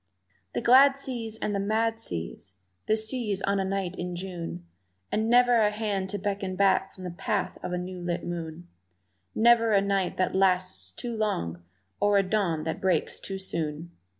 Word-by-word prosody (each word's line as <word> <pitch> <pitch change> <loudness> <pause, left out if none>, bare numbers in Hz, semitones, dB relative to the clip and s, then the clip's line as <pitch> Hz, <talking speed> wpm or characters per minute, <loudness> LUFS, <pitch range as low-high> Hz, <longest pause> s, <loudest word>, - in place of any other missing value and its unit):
The - - -1
glad 270 +3 +6
seas 235 -5 -5
and 210 - -2
the 200 - 0
mad 225 +3 0
seas, 90 - -5 0.3
the 215 - +3
seas 220 -3 -1
on 200 0 +1
a - - +1
night 190 -1 -2
in 180 0 -4
June, 175 - -6 0.5
And 220 +1 0
never 245 0 +5
a 215 -2 +4
hand 210 -3 -2
to 205 - -2
beckon 195 -1 -3
back 195 0 +3
from 185 - -10
the 180 - -4
path 195 +3 -2
of - - -4
the 180 - -2
new 180 +1 -5
lit 175 0 -3
moon; 170 0 -6 0.7
Never 230 -1 +5
a 200 - +6
night 195 -2 0
that 185 - +1
lasts 185 -1 +1
too 240 -2 -5
long 85 - -2 0.4
or 205 0 +4
a 195 - +4
dawn 185 -6 0
that 160 - -3
breaks 185 -4 +1
too 195 - -5
soon! 165 -3 -3
195 Hz, 180 wpm, -27 LUFS, 180-220 Hz, 0.7 s, glad